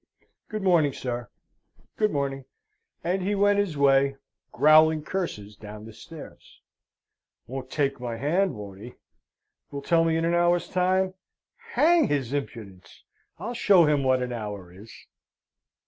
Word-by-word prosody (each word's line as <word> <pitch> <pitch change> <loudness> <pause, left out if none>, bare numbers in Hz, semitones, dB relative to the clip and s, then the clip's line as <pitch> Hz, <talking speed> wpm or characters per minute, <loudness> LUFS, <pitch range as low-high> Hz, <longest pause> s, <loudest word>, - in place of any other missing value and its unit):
Good 215 -2 -4
morning, 165 -7 +3
sir, 120 -2 -5 0.7
good 215 -1 +2
morning:" 135 -4 -3 0.6
and 180 +3 -1
he 200 +3 -1
went 205 0 +3
his 185 -7 -1
way, 135 0 +3 0.4
growling 155 0 +5
curses 130 - -4
down 105 0 -10
the 110 - -11
stairs. 160 +8 -13 0.9
"Won't 130 +1 -7
take 140 -2 -1
my 120 -2 -5
hand, 175 +8 0
won't 100 -2 -9
he? 120 +2 -10 0.7
Will 140 0 -7
tell 165 +1 +3
me 165 -1 +1
in 165 - 0
an 170 - +1
hour's 175 0 +2
time! 185 +1 +1 0.6
Hang 330 - +4
his 140 -3 -1
impudence! 110 -9 -7 0.3
I'll 215 +8 -5
show 195 -7 +5
him 150 -2 +2
what 130 -1 +2
an 125 0 -4
hour 105 -6 -7
is!" 105 +5 -13
145 Hz, 145 wpm, -26 LUFS, 120-180 Hz, 0.9 s, growling